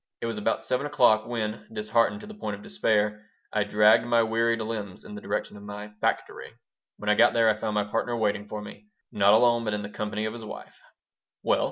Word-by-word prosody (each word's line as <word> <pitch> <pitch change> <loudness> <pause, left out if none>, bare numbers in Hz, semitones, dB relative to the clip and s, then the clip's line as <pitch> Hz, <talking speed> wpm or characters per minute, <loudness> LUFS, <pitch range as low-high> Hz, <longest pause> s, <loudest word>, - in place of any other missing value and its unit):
It - - -4
was 115 -2 -3
about 105 - -1
7 125 +2 -1
o'clock 115 -6 +3
when, 110 -2 -3
disheartened 115 - +1
to - - -9
the 215 - -9
point 210 - -4
of - - -13
despair, 105 - 0 0.3
I 105 - +2
dragged 105 +1 +5
my 120 -1 +4
wearied 115 +1 +1
limbs 110 -4 -5
in 210 - -9
the 210 - -8
direction 205 - -3
of - - -12
my 105 +1 -8
"factory." - - -2 0.4
When 105 - -9
I 105 - +5
got - - +5
there 115 -1 +4
I 110 - +4
found 105 0 -2
my 105 - +2
partner 115 +3 -2
waiting 105 -2 -1
for 105 0 -6
me 105 - -12 0.2
not 100 0 +4
alone, 120 0 +4
but 110 -2 -1
in 105 - -4
the 100 - -6
company 105 0 -3
of 110 - -3
his 115 -1 -8
wife 110 - -10 0.6
"Well?" - - +2
110 Hz, 225 wpm, -27 LUFS, 105-115 Hz, 0.6 s, dragged